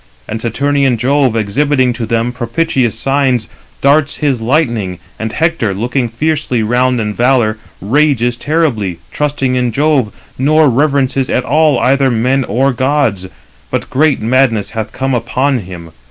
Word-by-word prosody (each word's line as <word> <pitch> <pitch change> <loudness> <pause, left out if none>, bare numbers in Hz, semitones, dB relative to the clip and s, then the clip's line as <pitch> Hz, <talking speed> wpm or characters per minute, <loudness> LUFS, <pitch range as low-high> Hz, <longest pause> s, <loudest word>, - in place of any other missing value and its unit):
301 - - -6
And 110 - -4
Saturnian 135 +2 +1
Jove 130 0 +1
exhibiting 130 +4 +1
to 115 -2 -5
them 115 +2 0
propitious 125 -1 -1
signs, 135 -4 0 0.3
darts 145 +2 +3
his 140 -6 0
lightning; 115 - 0 0.2
and 110 0 -3
Hector, 145 - 0
looking 120 +4 -1
fiercely 145 -1 -1
round 125 +2 +1
in 105 -1 -2
valour, 120 -2 +1 0.2
rages 120 +1 +1
terribly, 120 - -1
trusting 145 -3 -1
in 125 -1 0
Jove, 140 -3 +1 0.3
nor 150 +1 +4
reverences 135 0 +1
at 125 - 0
all 150 0 +3
either 135 +2 +2
men 130 +3 +1
or 130 +6 +1
gods, 130 -7 0 0.4
but - - -3
great 145 +1 +2
madness 115 -2 +1
hath 110 -1 -4
come 135 +2 -2
upon 130 +2 0
him. 90 -4 -10
130 Hz, 145 wpm, -14 LUFS, 115-140 Hz, 0.4 s, nor